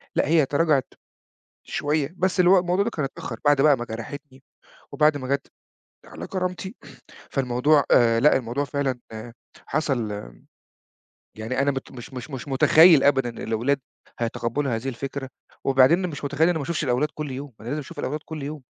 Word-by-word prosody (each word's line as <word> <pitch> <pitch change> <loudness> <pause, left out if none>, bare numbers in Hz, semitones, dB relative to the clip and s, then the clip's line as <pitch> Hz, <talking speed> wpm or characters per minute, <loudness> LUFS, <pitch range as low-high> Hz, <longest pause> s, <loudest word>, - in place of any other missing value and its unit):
لأ - - +2
هي 160 -2 +4
تراجعت 145 -2 +1 0.8
شوية 150 +1 -1
بس 185 +1 0
اللي 180 -1 +5
هو 195 - +7
الموضوع 180 +2 +1
ده 225 - -1
كان 155 -10 -3
اتأخّر 120 -3 -7
بعد 145 -1 +4
بقى 145 -1 +5
ما 120 - -5
جرحتني، 130 +4 -8 0.5
وبعد 150 0 +3
ما 130 -2 -5
جات 140 0 -1 0.6
على - - -9
كرامتي 185 +2 -4 0.6
فالموضوع، 135 +3 +2
آآ 115 -1 +5
لأ 150 +5 +5
الموضوع 125 +2 -2
فعلًا 140 -3 -2 0.7
حصل 135 -8 -1 1.3
يعني 115 +4 -3
أنا 140 +1 +2
مت 135 -1 -6
مش 125 +1 -10
مش 125 +2 -7
مش 135 0 -6
متخيّل 155 +3 +6
أبدًا 135 -3 +3
الأولاد 115 +4 -1 0.4
هيتقبلوا 120 +3 -1
هذه 115 +4 -3
الفكرة. 135 +1 -6 0.3
وبعدين 135 +8 +4
مش 145 -3 -8
متخيّل 145 +2 0
إن 165 - +5
أنا 175 - +1
ما - - -3
أشوفش 170 +3 -2
الأولاد 130 +2 +1
كل 150 -2 -5
يوم 135 +1 -7
أنا 110 - -10
لازم 145 +5 -2
أشوف 140 - -9
الأولاد 150 +4 -2
كل 155 -3 -7
يوم، 150 +1 -6
140 Hz, 175 wpm, -24 LUFS, 130-155 Hz, 1.3 s, هو